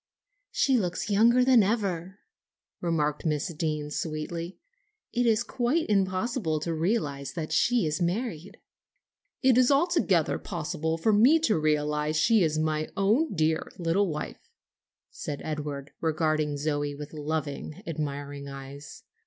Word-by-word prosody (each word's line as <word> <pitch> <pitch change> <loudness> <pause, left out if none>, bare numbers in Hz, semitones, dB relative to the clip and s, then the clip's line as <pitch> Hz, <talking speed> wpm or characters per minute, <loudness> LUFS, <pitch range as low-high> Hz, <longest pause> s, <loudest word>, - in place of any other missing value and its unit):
"She 265 -2 +2
looks 185 +1 -2
younger 235 +5 +5
than 255 -3 +6
ever," 190 -3 -1 0.6
remarked 150 -4 0
Miss 155 +2 -1
Deane, 150 -2 -2
sweetly. 165 +3 -4 0.6
"It 245 0 +2
is 225 0 +3
quite 250 +7 0
impossible 190 - 0
to 165 +2 -2
realize 155 -5 -1
that 160 -2 -4
she 235 +6 +3
is 155 +1 -1
married." 195 0 -2 0.9
"It 255 -1 +5
is 250 - +5
altogether 280 - +2
possible 160 -2 -3
for 215 +6 +2
me 245 +10 +6
to 230 -9 +2
realize 150 0 0
that - - +2
she 225 +1 +4
is 155 -2 +1
my 155 0 -1
own 215 +8 +2
dear 160 0 +1
little 175 +4 +1
wife," 150 -1 -6 0.6
said 145 - -5
Edward, 150 -2 -4
regarding 155 -2 0
Zoe 145 -1 -1
with 150 +1 -9
loving, 155 +3 -4
admiring 145 -3 -4
eyes. 140 +1 -9
165 Hz, 135 wpm, -27 LUFS, 150-210 Hz, 0.9 s, than